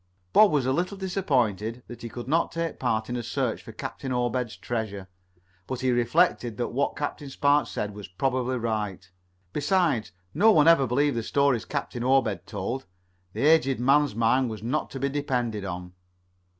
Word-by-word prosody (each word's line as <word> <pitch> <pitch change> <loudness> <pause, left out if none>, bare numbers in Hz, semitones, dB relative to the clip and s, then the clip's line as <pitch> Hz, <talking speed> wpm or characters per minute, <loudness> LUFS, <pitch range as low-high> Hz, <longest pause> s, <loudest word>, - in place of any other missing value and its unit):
Bob 215 -1 +7
was 145 -5 +1
a 130 - +2
little 180 +6 -1
disappointed 125 - -1
that 120 - -10
he 115 - -6
could 120 +1 -7
not 165 +4 +1
take 165 -1 -3
part 110 -3 0
in 125 - -3
a 120 - -2
search - - -2
for - - -10
Captain 135 - -6
Obed's 125 -1 -1
treasure, 105 -5 -4 0.6
but 130 -1 -4
he 130 -1 +2
reflected 120 -1 +2
that 120 - -1
what 140 +3 -1
Captain 145 -1 -4
Spark 145 +2 +2
said 105 -1 -4
was 105 -2 -8
probably 130 +6 -1
right, 105 -5 -3 0.4
resides, 155 - +1 0.2
no 210 +9 +5
one 155 -7 +5
ever 165 -6 +6
believed 140 +3 +1
the - - 0
stories 140 0 +1
Captain 135 -4 -4
Obed 125 -8 +1
told. 110 +6 -4 0.5
The - - -1
aged 135 -5 +4
man's 140 0 +3
mind 120 +3 +2
was 110 -2 -7
not 130 +7 -1
to 135 - -7
be 140 - 0
depended 125 -7 -2
on. 90 -1 -6
125 Hz, 175 wpm, -26 LUFS, 115-145 Hz, 0.6 s, Bob